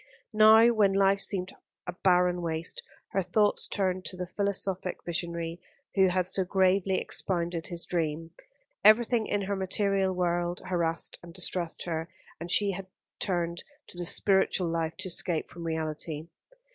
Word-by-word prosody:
Now, 220 +2 +7
when 205 -3 +3
life 195 0 +3
seemed 185 -2 -2 0.3
a - - -3
barren 180 -1 +2
waste, 165 0 -2 0.3
her 195 - 0
thoughts 205 +3 +1
turned 185 -2 -1
to 185 - -4
the 180 - -3
philosophic 190 -1 -1
visionary 170 0 -3 0.3
who 190 -1 +4
had 180 0 +1
so 190 +1 +1
gravely 190 0 +2
expounded 170 -2 0
his 170 -1 -3
dream. 165 -1 -2 0.5
Everything 225 +1 +5
in 205 -1 -1
her 200 +1 -2
material 195 0 0
world 175 -1 -1
harassed 170 -3 -1
and 170 -1 -13
distressed 180 -2 -2
her, 165 -1 -4 0.3
and 170 - -7
she 200 +1 +3 0.4
turned 170 -3 -2 0.3
to - - -7
the 175 - -2
spiritual 190 -1 +2
life 165 -1 -2
to 190 0 -3
escape 170 -2 -1
from 170 0 -8
reality. 160 0 -4
180 Hz, 145 wpm, -28 LUFS, 170-195 Hz, 0.5 s, Now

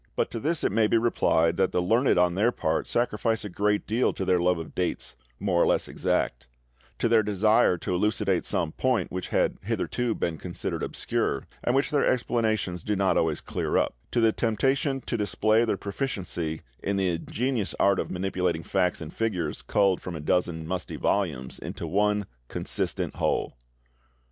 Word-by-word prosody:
But - - 0
to 115 - -4
this 155 +5 -1
it - - +2
may 110 +1 +3
be 115 - +3
replied 85 -7 +2
that 95 -1 +2
the - - +1
learned 115 +8 +3
on 90 0 +4
their 105 +6 +2
part 80 -8 -1
sacrifice 115 -2 0
a - - -4
great 105 +3 0
deal 115 +4 +1
to 95 - -3
their 90 -1 +3
love 90 0 +2
of 80 -2 -7
dates, 90 -1 -3 0.2
more 90 -3 +1
or - - +4
less - - +2
exact; - - -1 0.5
to - - +1
their 115 -1 +5
desire 105 -1 +3
to 90 - -3
elucidate 105 +5 +1
some 80 - 0
point 130 +4 0
which 90 0 -4
had - - +1
hitherto 120 -2 -1
been 80 -2 -2
considered 90 -1 -4
obscure, - - -2 0.2
and 120 - +1
which 135 - +1
their 145 -2 +2
explanations 110 -7 0
do 105 - -1
not 95 -1 +2
always 80 -2 +1
clear - - -1
up; - - +1 0.2
to 120 - 0
the 115 -1 +5
temptation 135 +5 0
to 120 - -3
display 110 +2 +2
their 110 - 0
proficiency 95 - -3 0.2
in 100 0 -1
the 95 -1 +2
ingenious 115 +6 -2
art 100 -1 +4
of - - -2
manipulating 90 -3 -1
facts 90 +1 0
and 80 0 -7
figures 105 -8 -2
culled 100 -3 +2
from 90 - -6
a - - -5
dozen 80 +1 0
musty 90 +1 -3
volumes 75 -11 -1
into - - -6
one 105 +4 +1 0.2
consistent - - -1
whole. - - 0
100 Hz, 185 wpm, -27 LUFS, 90-115 Hz, 0.5 s, their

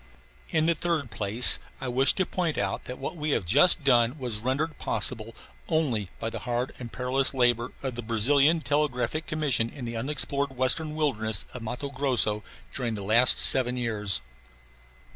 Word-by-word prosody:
In 160 -1 +1
the 170 - +3
third 160 -6 -3
place 110 +2 +5 0.2
I 135 - -5
wish 130 +2 +3
to 190 - -1
point 175 -4 -3
out 95 -1 -3
that 125 - -7
what - - -6
we 155 -1 -4
have 95 - -7
just 145 - +3
done 120 0 +2
was 120 -6 -3
rendered 140 +7 -2
possible 115 -2 -1 0.3
only 130 - -1
by 115 - -5
the - - -6
hard 120 +1 -3
and 120 -2 -8
perilous 130 +2 0
labor 120 -1 +1
of 130 -2 -3
the 120 - -5
Brazilian 140 +8 +2
Telegraphic 150 0 -1
Commission 145 -7 0
in 125 0 -9
the 115 0 -6
unexplored 140 +1 -1
western 150 +5 0
wilderness 110 -9 0
of 125 - -7
Matto 125 +5 -6
Grosso 125 -6 0 0.3
during 120 -4 -3
the 100 - -6
last 115 +5 +5
seven 125 -1 +4
years. 105 - +1
125 Hz, 170 wpm, -26 LUFS, 115-145 Hz, 0.3 s, place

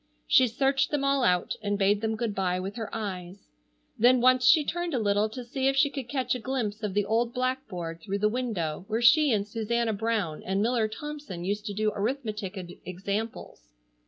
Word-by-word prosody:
She 255 - +5
searched 270 +3 +1
them 295 -2 -1
all 275 -1 +2
out 180 -6 +2
and 205 -1 -1
bade 200 +1 +2
them 220 0 -1
good 220 -1 -2
bye 185 -2 0
with 195 +3 -5
her 225 -3 -5
eyes. 190 -3 -6 0.5
Then 245 +3 +6
once 255 +1 +4
she 310 -3 +6
turned 345 -1 -2
a - - +2
little 205 -1 +1
to 250 +3 -7
see 265 +2 -1
if 270 - +2
she 280 +1 +3
could 270 -4 -6
catch 265 -3 0
a 250 - -3
glimpse 225 -4 -3
of 205 -3 -3
the 205 -1 +2
old 230 +3 0
blackboard 220 -11 -3
through 195 +4 -3
the 210 +1 +2
window 210 -10 -2
where 225 +2 -1
she 295 +4 +6
and 205 -2 +1
Susanna 225 +1 -1
Brown 205 -7 -1
and 190 +1 -1
Miller 225 +1 +2
Thompson 290 -6 -7
used 205 +4 -2
to 205 - -3
do 215 +1 +1
arithmetic 210 -3 -3 0.3
examples. 190 - -5
220 Hz, 200 wpm, -27 LUFS, 200-255 Hz, 0.5 s, Then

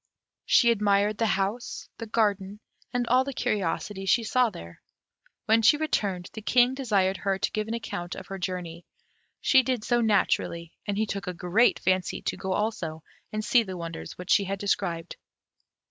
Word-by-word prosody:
She 235 -1 +5
admired 205 -1 +2
the 225 - +2
house, 200 +4 -2
the 230 - -5
garden, 205 -2 0 0.3
and 245 0 0
all 250 +2 +4
the 275 -1 -6
curiosities 195 -1 -2
she 235 - +4
saw 250 0 +2
there. 85 - -11 0.6
When 225 +1 +4
she 260 +7 +6
returned, 200 - -1
the 220 - -7
King 245 +3 +4
desired 200 -8 +1
her 195 -1 -1
to - - -1
give 215 0 -2
an 225 - -2
account 175 -6 -5
of - - -8
her 195 0 -7
journey; 175 -2 -4 0.6
she 265 - +5
did 255 -4 -2
so 240 0 +2
naturally, 175 -6 +1
and 200 -1 -1
he 220 - +1
took 200 -2 -5
a 180 - -3
great 185 +8 +3
fancy 185 -1 0
to - - -1
go 190 0 -3
also 170 -8 -2 0.3
and 215 0 -3
see 245 - +5
the 190 -5 -6
wonders 170 -1 -6
which 180 +2 -5
she 195 -1 +3
described. 175 -4 -2
205 Hz, 175 wpm, -27 LUFS, 185-230 Hz, 0.6 s, she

